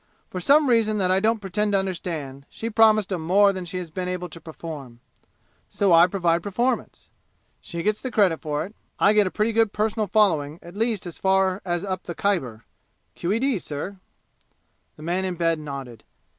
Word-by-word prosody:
For 185 - -4
some 285 - +4
reason 225 -3 +3
that 185 -2 +1
I 190 - +4
don't 220 +2 +2
pretend 205 +1 -1
to - - +5
understand, 160 -8 -4
she 230 +1 -5
promised 215 -3 +4
'em 175 - -2
more 200 +5 +4
than 185 -1 -5
she 175 +2 -5
has 175 -3 -6
been 180 +2 -4
able 180 -1 -3
to 165 +1 -11
perform. 150 -7 -9 0.7
So 195 -3 +2
I 170 +1 +7
provide 175 -3 +1
performance. 235 +6 -2 0.5
She 170 -1 -5
gets 215 0 0
the 260 - -3
credit 200 -8 +2
for 150 0 -2
it. 200 - -12 0.2
I 205 - +4
get 210 -2 +4
a - - 0
pretty 215 +4 0
good 225 -2 +2
personal 215 0 0
following 170 -8 +2
at 175 +2 -12
least 220 -2 -1
as 175 - -8
far 190 0 +2
as 175 +1 -2
up 185 -1 -3
the 175 - -5
Khyber! 130 - -1 0.5
Q.E.D., 225 +6 0
sir!" 170 +6 -6 1.0
The 155 - -12
man 175 +3 -1
in 185 -1 -2
bed 165 -1 +1
nodded. 135 -5 -7
185 Hz, 190 wpm, -24 LUFS, 165-210 Hz, 1.0 s, I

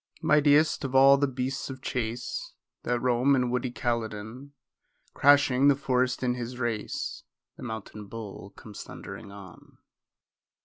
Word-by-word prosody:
Mightiest 150 +1 +4
of 135 -1 -3
all 135 +1 +8
the 145 +1 +1
beasts 130 +1 -3
of 130 -1 -7
chase 125 - -4 0.3
That 120 0 -1
roam 125 +3 +3
in 125 -2 0
woody 125 0 -1
Caledon, 120 +1 -4 0.6
Crashing 140 -1 +4
the 140 - +6
forest 130 -1 0
in 125 -1 +1
his 125 0 -6
race, 120 -4 -3 0.3
The - - -14
mountain 105 -2 -7
bull 105 -2 -8
comes 105 -2 -10
thundering 100 - -9
on. 100 -3 -14
125 Hz, 135 wpm, -27 LUFS, 115-135 Hz, 0.6 s, all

